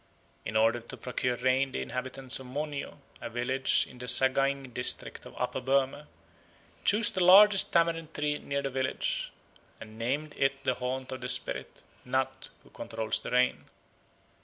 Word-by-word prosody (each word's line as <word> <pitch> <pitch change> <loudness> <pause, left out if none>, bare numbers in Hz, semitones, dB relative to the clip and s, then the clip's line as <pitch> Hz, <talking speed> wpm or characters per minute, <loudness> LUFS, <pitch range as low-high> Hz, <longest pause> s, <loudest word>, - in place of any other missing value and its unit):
In 110 - -1
order 115 +2 +3
to 120 +3 -10
procure 125 +1 -2
rain 130 +2 +1
the - - -2
inhabitants 130 +1 -3
of 130 - -10
Monyo, 145 +2 -5 0.2
a - - -5
village 125 +3 0
in 125 - -15
the 125 - -7
Sagaing 135 0 +2
district 125 - 0
of - - -14
Upper - - -2
Burma, 135 +2 0 0.8
chose 210 +2 +3
the 185 - 0
largest 195 +2 +7
tamarind 165 -1 +1
tree 145 0 -2
near 140 0 -3
the 135 - -3
village 130 0 -2 0.5
and 110 +1 -12
named 145 +6 -2
it 135 0 0
the 130 - +1
haunt 130 +1 -4
of 130 0 -6
the 125 - -3
spirit 125 0 0 0.2
(nat) - - -2
who - - -21
controls 110 -1 -2
the - - -7
rain. 125 0 +1
130 Hz, 160 wpm, -29 LUFS, 125-140 Hz, 0.8 s, largest